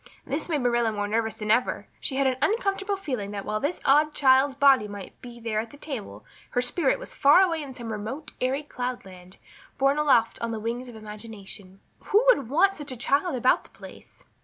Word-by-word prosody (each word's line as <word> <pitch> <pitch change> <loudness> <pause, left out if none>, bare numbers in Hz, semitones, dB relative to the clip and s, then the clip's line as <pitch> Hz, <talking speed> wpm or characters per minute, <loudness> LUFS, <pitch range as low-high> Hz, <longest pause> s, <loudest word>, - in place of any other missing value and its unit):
This 290 +6 -3
made 300 -4 0
Marilla 240 -2 +2
more 205 -1 -2
nervous 220 +1 -1
than 210 -1 -2
ever; 240 +3 +1
she 265 - -1
had 275 0 +1
an 260 -1 +1
uncomfortable 400 -2 0
feeling 255 - -4
that 200 -1 -6
while 215 0 -2
this 290 +7 -2
odd 300 +2 +4
child's 265 0 +4
body 270 -5 +5
might 200 -2 -10
be 240 -1 -10
there 225 -2 -2
at 225 +1 -4
the 285 - -14
table 225 - -7 0.2
her - - 0
spirit 350 - +1
was - - -8
far 285 +5 +6
away 335 -4 +1
in 270 -3 -8
some 235 -3 -6
remote 220 +9 -6
airy 265 +3 0
cloudland, 195 -10 -7 0.4
borne 275 +2 +2
aloft 240 -7 +3
on 230 - -2
the 225 -1 -3
wings 235 +3 -4
of 240 - -11
imagination. 210 -3 -9 0.2
Who 430 +4 +3
would 280 - +3
want 385 +8 +3
such 295 -2 -6
a 255 - -6
child 280 +6 +1
about 255 +1 +3
the - - -19
place? - - -14
255 Hz, 210 wpm, -26 LUFS, 220-290 Hz, 0.4 s, far